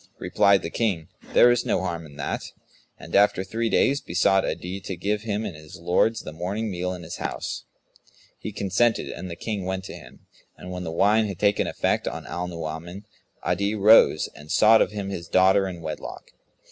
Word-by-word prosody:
Replied 100 Hz, -1 st, +3 dB
the 85 Hz, -, -4 dB
King, 95 Hz, -9 st, -1 dB, 0.2 s
"There 120 Hz, -, +7 dB
is 120 Hz, -1 st, +1 dB
no -, -, 0 dB
harm 85 Hz, -3 st, -4 dB
in 70 Hz, -, -15 dB
that;" 70 Hz, -, -3 dB, 0.6 s
and -, -, -7 dB
after 100 Hz, -2 st, +4 dB
three 115 Hz, +4 st, -2 dB
days, 140 Hz, +5 st, +2 dB
besought 95 Hz, +3 st, +2 dB
Adi 90 Hz, +2 st, -4 dB
to 95 Hz, 0 st, -5 dB
give 105 Hz, +4 st, -1 dB
him 105 Hz, 0 st, -2 dB
and 85 Hz, -, -5 dB
his 75 Hz, +1 st, -12 dB
lords 90 Hz, +6 st, +1 dB
the 75 Hz, -, -8 dB
morning 100 Hz, +7 st, -3 dB
meal 90 Hz, 0 st, -2 dB
in 90 Hz, -, -10 dB
his 80 Hz, -, -7 dB
house. -, -, -4 dB, 0.7 s
He 110 Hz, -, -5 dB
consented 105 Hz, +4 st, +1 dB
and 95 Hz, -, -7 dB
the 85 Hz, -, -6 dB
King 105 Hz, +1 st, -4 dB
went 95 Hz, +1 st, -3 dB
to -, -, -8 dB
him; -, -, -14 dB, 0.3 s
and 90 Hz, -, -9 dB
when 90 Hz, 0 st, -5 dB
the 80 Hz, -, -4 dB
wine 105 Hz, +6 st, +3 dB
had 100 Hz, -3 st, -5 dB
taken 105 Hz, +1 st, +2 dB
effect -, -, -1 dB
on -, -, -5 dB
Al 90 Hz, 0 st, -4 dB
Nu'uman, 85 Hz, +3 st, -6 dB, 0.4 s
Adi 100 Hz, +4 st, 0 dB
rose 105 Hz, -6 st, +6 dB
and 75 Hz, +2 st, -11 dB
sought 110 Hz, +1 st, +6 dB
of -, -, +2 dB
him 100 Hz, -2 st, -4 dB
his 85 Hz, -3 st, -6 dB
daughter 95 Hz, +1 st, +4 dB
in 90 Hz, -3 st, -7 dB
wedlock. 80 Hz, -1 st, -7 dB
95 Hz, 195 wpm, -25 LUFS, 85-105 Hz, 0.7 s, There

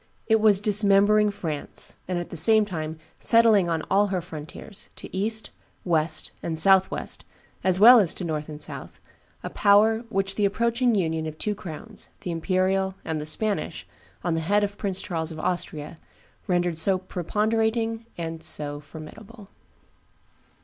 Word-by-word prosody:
] -, -, -40 dB
It -, -, +2 dB
was 210 Hz, -3 st, +5 dB
dismembering 210 Hz, 0 st, +4 dB
France, 160 Hz, -7 st, -4 dB
and 180 Hz, -1 st, -2 dB
at 175 Hz, -, -5 dB
the -, -, -6 dB
same 220 Hz, +5 st, +4 dB
time 160 Hz, -5 st, -5 dB, 0.2 s
settling 225 Hz, -6 st, +4 dB
on 165 Hz, -2 st, -1 dB
all 205 Hz, +1 st, +2 dB
her 190 Hz, -2 st, -1 dB
frontiers, 165 Hz, +5 st, -9 dB
to -, -, -10 dB
east, 220 Hz, +3 st, -2 dB, 0.3 s
west, 160 Hz, -2 st, +1 dB
and 160 Hz, -1 st, -3 dB
south 190 Hz, +2 st, +5 dB
west, -, -, -4 dB, 0.4 s
as 185 Hz, -1 st, +2 dB
well 240 Hz, +4 st, +9 dB
as 190 Hz, -6 st, +1 dB
to -, -, -5 dB
north 155 Hz, -2 st, -3 dB
and 150 Hz, -1 st, -8 dB
south, 150 Hz, -, -7 dB, 0.4 s
a -, -, -5 dB
power 215 Hz, +2 st, +4 dB
which 195 Hz, -2 st, -1 dB
the 210 Hz, -, -2 dB
approaching 235 Hz, +3 st, +1 dB
union 160 Hz, -4 st, -1 dB
of 155 Hz, 0 st, -7 dB
two 210 Hz, +6 st, -1 dB
crowns, 200 Hz, +4 st, -8 dB
the 180 Hz, -, -4 dB
imperial 190 Hz, +3 st, 0 dB
and 160 Hz, -1 st, -3 dB
the 150 Hz, -, -5 dB
Spanish, 210 Hz, +6 st, -1 dB, 0.4 s
on 175 Hz, -, 0 dB
the 165 Hz, -, -1 dB
head 205 Hz, +6 st, +2 dB
of 205 Hz, 0 st, -2 dB
Prince 195 Hz, -2 st, -2 dB
Charles 165 Hz, -3 st, -3 dB
of 160 Hz, -, -8 dB
Austria, 160 Hz, -3 st, -4 dB, 0.5 s
rendered 175 Hz, -2 st, 0 dB
so 190 Hz, +3 st, +4 dB
preponderating 220 Hz, +5 st, -1 dB
and 165 Hz, -1 st, -5 dB
so 145 Hz, -2 st, -2 dB
formidable. 195 Hz, +8 st, -12 dB
190 Hz, 165 wpm, -25 LUFS, 160-210 Hz, 0.5 s, well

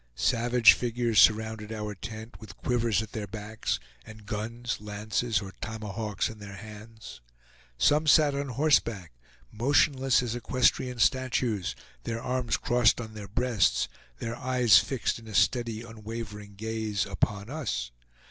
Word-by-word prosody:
Savage 120 Hz, -, +5 dB
figures 120 Hz, -2 st, +2 dB
surrounded 110 Hz, 0 st, +2 dB
our 105 Hz, -1 st, -4 dB
tent, 110 Hz, +4 st, -9 dB
with 100 Hz, -5 st, -12 dB
quivers 115 Hz, -4 st, +1 dB
at 110 Hz, -, -11 dB
their 105 Hz, -2 st, -5 dB
backs, 105 Hz, +2 st, -3 dB, 0.2 s
and 110 Hz, -1 st, -13 dB
guns, 115 Hz, +4 st, -4 dB
lances, 105 Hz, +1 st, -1 dB
or 95 Hz, -1 st, -9 dB
tomahawks 110 Hz, -2 st, -3 dB
in 110 Hz, -1 st, -9 dB
their 100 Hz, -1 st, -9 dB
hands. 105 Hz, -, -11 dB, 0.6 s
Some 150 Hz, -, +3 dB
sat 150 Hz, -1 st, +6 dB
on 140 Hz, 0 st, -3 dB
horseback, 120 Hz, -, +1 dB, 0.4 s
motionless 135 Hz, +2 st, +3 dB
as 115 Hz, -2 st, -2 dB
equestrian 125 Hz, +1 st, +1 dB
statues, 115 Hz, -4 st, +1 dB, 0.3 s
their 115 Hz, 0 st, -4 dB
arms 125 Hz, -1 st, -1 dB
crossed 120 Hz, -2 st, +3 dB
on 110 Hz, -2 st, -7 dB
their 105 Hz, -2 st, -8 dB
breasts, 100 Hz, -, +1 dB, 0.3 s
their 115 Hz, -, -4 dB
eyes 125 Hz, -3 st, +5 dB
fixed 125 Hz, -3 st, -2 dB
in 115 Hz, -, -14 dB
a 110 Hz, -, -7 dB
steady 120 Hz, -2 st, +1 dB
unwavering 110 Hz, -2 st, -8 dB
gaze 110 Hz, -1 st, -2 dB
upon 105 Hz, +3 st, -2 dB
us. 125 Hz, -, -3 dB
110 Hz, 140 wpm, -28 LUFS, 105-120 Hz, 0.6 s, sat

